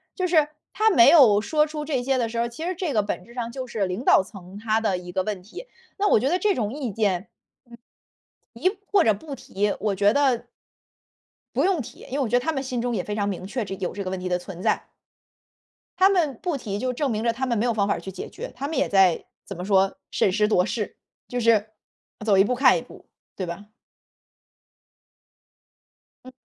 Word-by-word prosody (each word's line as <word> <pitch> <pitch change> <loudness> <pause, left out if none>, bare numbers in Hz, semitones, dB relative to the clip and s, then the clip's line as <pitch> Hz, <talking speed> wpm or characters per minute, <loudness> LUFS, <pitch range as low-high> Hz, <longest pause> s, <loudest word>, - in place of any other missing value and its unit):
就 370 -2 0
是， 315 -4 +3 0.2
他 440 +1 +3
没 235 - +6
有 245 -11 +7
说 300 +8 +2
出 300 -1 -5
这 275 -5 -1
些 265 +1 +1
的 240 -2 0
时 230 +1 -6
候， 235 - +1
其 275 +8 -7
实 365 +1 -2
这 340 -3 -2
个 215 - +3
本 200 -3 -4
质 235 - -16
上 235 -1 -4
就 260 0 -5
是 220 -4 -1
领 185 +7 -4
导 - - +6
层 190 -1 -12
他 220 +1 0
的 200 -4 0
一 180 0 -8
个 190 0 0
问 205 -2 -4
题， 220 - -10 0.3
那 410 0 +2
我 - - +5
觉 250 - 0
得 360 - +2
这 410 +2 +2
种 215 -1 -2
意 270 -5 -4
见， 195 -2 -1 1.2
嗯， - - -14
提 375 +3 +1
或 395 -4 +5
者 220 - +4
不 275 +8 -8
提， 205 -4 -2
我 205 -2 0
觉 200 +2 +3
得 265 -5 +2 1.1
不 - - +2
用 370 -6 +2
提， - - -12
因 - - -14
为 285 - 0
我 270 - +1
觉 230 - -3
得 - - -3
他 320 - 0
们 275 -4 -2
心 255 -2 -3
中 245 0 -1
也 185 - -2
非 210 - -4
常 205 -1 -1
明 185 -2 -4
确， 230 +3 -3
这 195 -1 -5
有 185 - -3
这 205 - -5
个 185 - -4
问 190 - -3
题 185 - -4
的 180 -1 +1
存 180 0 -9
在。 - - +1 1.1
他 375 +1 +6
们 325 - +1
不 345 -5 -1
提 205 -6 -4
就 255 +3 -1
证 275 +2 -1
明 215 -1 -1
着 230 0 +2
他 260 +3 -3
们 235 -2 0
没 215 - +1
有 240 -2 +1
方 205 -2 +1
法 200 - +1
儿 - - -5
去 190 - -7
解 180 - -7
决， - - -8
他 265 +3 -4
们 320 - -4
也 - - +2
在 190 -4 +4 0.2
怎 195 - -8
么 180 - -5
说， 195 0 +2
审 190 - +2
时 210 +2 +2
度 180 -4 +3
势， 215 0 -4 0.3
就 245 0 -2
是 220 -2 +3 0.6
走 210 -3 +4
一 195 - +7
步 250 +4 0
看 - - +5
一 - - -6
步， - - -16 0.3
对 185 - -3
吧？ 185 +4 -7 2.6
嗯。 255 - -11
230 Hz, 255 characters per minute, -24 LUFS, 200-275 Hz, 2.6 s, 有